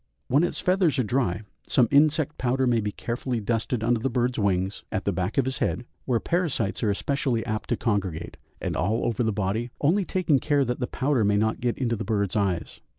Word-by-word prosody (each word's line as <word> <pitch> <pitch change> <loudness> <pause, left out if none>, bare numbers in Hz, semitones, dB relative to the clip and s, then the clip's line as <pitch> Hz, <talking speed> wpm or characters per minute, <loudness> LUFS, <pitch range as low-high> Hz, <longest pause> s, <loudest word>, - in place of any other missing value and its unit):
When 140 +6 +4
its 175 - -1
feathers 180 -5 +2
are 130 - +2
dry, 110 -4 0 0.2
some 120 - +4
insect 150 +1 +3
powder 130 +1 +1
may 120 -2 +2
be 105 0 -2
carefully 120 +3 -3
dusted 115 +2 -1
under 120 0 +2
the 135 - -1
bird's 125 0 0
wings, 95 -1 0
at 95 - -2
the 100 - +2
back 90 -1 -2
of 135 - +3
his 130 0 -2
head, 120 - -1 0.2
where 120 -3 +1
parasites 155 - -1
are 110 - +1
especially 120 +2 0
apt 110 -1 -3
to - - +1
congregate, 95 -8 -2 0.2
and - - -3
all 110 +6 0
over 120 -1 0
the 110 -2 +2
body, 105 +4 -1
only 180 +8 +3
taking 175 -7 +1
care 145 -1 +2
that 125 0 -2
the 125 - -1
powder 135 -3 +1
may 105 0 +3
not 110 +1 0
get 120 -1 0
into 120 -3 0
the - - -4
bird's 100 -2 -1
eyes. 95 -5 -1
120 Hz, 215 wpm, -26 LUFS, 105-135 Hz, 0.2 s, When